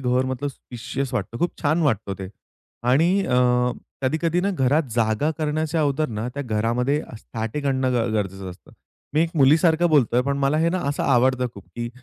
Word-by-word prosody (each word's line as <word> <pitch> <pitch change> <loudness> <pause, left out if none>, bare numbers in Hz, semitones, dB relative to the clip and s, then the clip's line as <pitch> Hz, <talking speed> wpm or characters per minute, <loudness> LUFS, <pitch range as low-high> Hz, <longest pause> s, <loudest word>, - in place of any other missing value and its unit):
घर 125 0 +1
मतलब 130 +2 -2
स्पेशियस 130 +1 -6
वाटतं 120 -1 -3
खूप 175 - +1
छान 155 +3 +2
वाटतं 110 -9 0
ते 95 -1 -6 0.6
आणि 150 +7 +4 0.2
अ, 125 -1 +1 0.7
कधी-कधी 165 +6 +1
ना 200 - 0
घरात 145 -3 +2
जागा 115 +6 +1
करण्याच्या 155 +1 -1
अगोदर 150 0 +1
ना 110 +2 -4
त्या 145 - -3
घरामध्ये 125 +5 0 0.2
स्टॅटिक 115 +7 -5
आणणं 130 -1 +1 0.2
गरजेचं 95 -2 -3
असतं. 90 - -15 0.4
मी 155 - +3
एक 165 - -1
मुलीसारखं 160 +4 +4
बोलतोय 130 -6 +3
पण 140 +1 -1
मला 140 +2 +1
हे 165 +1 +3
ना 185 +2 0
असं 145 - -1
आवडतं 130 -1 +3
खूप, 100 - -12
की 120 0 -3
135 Hz, 175 wpm, -23 LUFS, 120-155 Hz, 0.7 s, आणि